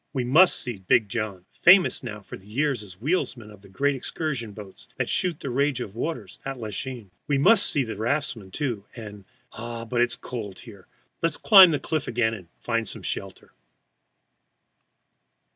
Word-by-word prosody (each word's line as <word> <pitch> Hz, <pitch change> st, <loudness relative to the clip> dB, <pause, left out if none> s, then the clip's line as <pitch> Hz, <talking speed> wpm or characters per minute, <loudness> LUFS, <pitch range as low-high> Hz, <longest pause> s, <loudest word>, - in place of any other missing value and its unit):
We 130 Hz, -3 st, -1 dB
must 160 Hz, +9 st, +5 dB
see 120 Hz, -5 st, -5 dB
"Big 100 Hz, +3 st, +2 dB
John," 100 Hz, -4 st, -4 dB, 0.2 s
famous 185 Hz, +2 st, +6 dB
now 105 Hz, -4 st, -7 dB
for -, -, -10 dB
years 120 Hz, +6 st, -2 dB
as 95 Hz, -4 st, -10 dB
wheelsman 125 Hz, -, -2 dB
of 105 Hz, -2 st, -15 dB
the 100 Hz, -, -17 dB
great 140 Hz, +8 st, +1 dB
excursion 135 Hz, -4 st, -4 dB
boats 100 Hz, -2 st, -12 dB
that -, -, -1 dB
shoot 175 Hz, -4 st, +1 dB
the 135 Hz, -, -4 dB
rage 140 Hz, +1 st, +1 dB
of 105 Hz, -5 st, -6 dB
waters 160 Hz, +9 st, -5 dB
at 135 Hz, -1 st, -5 dB
Lachine. 110 Hz, 0 st, -6 dB, 0.2 s
We 145 Hz, -, +2 dB
must 205 Hz, +9 st, +5 dB
see 140 Hz, -, +1 dB
the 110 Hz, -2 st, -5 dB
raftsmen, 115 Hz, -2 st, -2 dB
too, 120 Hz, -4 st, -3 dB
and 105 Hz, -4 st, -10 dB, 0.3 s
ah, 115 Hz, 0 st, -6 dB
but 120 Hz, +1 st, 0 dB
it -, -, +6 dB
is 115 Hz, -, -4 dB
cold 105 Hz, -6 st, -7 dB
here! 100 Hz, -6 st, -14 dB, 0.3 s
let 165 Hz, -, +3 dB
us -, -, -3 dB
climb 195 Hz, -4 st, +9 dB
the 150 Hz, -3 st, 0 dB
cliff 155 Hz, -3 st, -2 dB
again 115 Hz, -1 st, +1 dB
and 95 Hz, -6 st, -9 dB
find 115 Hz, -2 st, -2 dB
some -, -, -5 dB
shelter. 95 Hz, -1 st, -6 dB
120 Hz, 180 wpm, -25 LUFS, 105-140 Hz, 0.3 s, climb